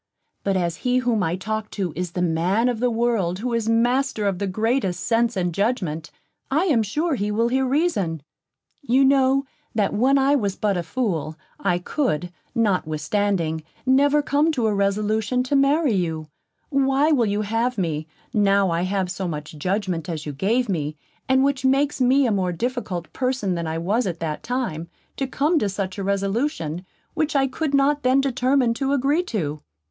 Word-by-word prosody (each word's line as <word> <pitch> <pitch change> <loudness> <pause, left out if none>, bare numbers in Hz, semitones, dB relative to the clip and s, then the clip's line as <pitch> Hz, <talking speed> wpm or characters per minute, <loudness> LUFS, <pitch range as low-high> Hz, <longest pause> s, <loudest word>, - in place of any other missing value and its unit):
But 195 -1 +1
as 170 -2 -1
he 250 0 +1
whom 240 -4 +1
I 165 -1 0
talk 215 +3 -4
to 185 -5 -2
is 180 0 -4
the 180 - -1
man 180 +8 +1
of 240 -3 -2
the 250 +1 +2
world 225 -7 0
who 240 +4 -3
is 230 -1 0
master 240 0 +1
of 195 -3 0
the 200 - -1
greatest 215 -2 0
sense 235 -1 +1
and 175 -2 0
judgment, 175 -7 -1 0.4
I 295 +6 +2
am 280 -11 +3
sure 300 - -1
he 210 -5 -1
will 230 +3 +1
hear 265 +1 +1
reason. 230 - 0 0.6
You 270 0 +3
know, 270 0 +3 0.3
that 210 -3 +1
when 260 +6 +3
I 275 +1 +3
was 200 -7 0
but 205 -2 0
a 175 - 0
fool, 165 - -2 0.2
I 175 - +1
could, 180 - -1 0.2
notwithstanding, 185 -3 0 0.2
never 285 +3 +4
come 295 +3 +2
to 245 -6 0
a 215 - +2
resolution 210 +4 0
to 260 +3 -1
marry 280 0 +3
you; 160 -5 -2 0.4
why 275 +2 +2
will 245 -7 +3
you 205 +1 0
have 225 +4 -1
me, 160 -4 -2 0.3
now 200 -3 +3
I 165 +1 0
have 185 0 -1
so 185 0 -3
much 150 -2 -5
judgment 185 -1 -2
as 155 -3 -4
you 150 - -4
gave 225 - +1
me, 155 -6 -2 0.3
and 265 0 +4
which 275 -2 0
makes 275 +1 +2
me 260 +2 +4
a 235 - +2
more 190 -3 0
difficult 195 -4 -3
person 255 -7 -1
than 170 -1 -3
I 160 0 -2
was 200 +8 0
at 170 -2 -4
that 155 -2 -3
time, 235 -11 -3 0.3
to 270 - -1
come 300 +5 +1
to 210 - 0
such 195 0 -4
a - - -2
resolution, 195 - -1 0.3
which 310 -2 -1
I 270 -1 +4
could 280 +2 -1
not 285 +1 +3
then 255 +1 +3
determine 260 -2 +2
to 270 +3 -1
agree 285 +5 +2
to? 155 - -3
215 Hz, 185 wpm, -23 LUFS, 180-260 Hz, 0.6 s, never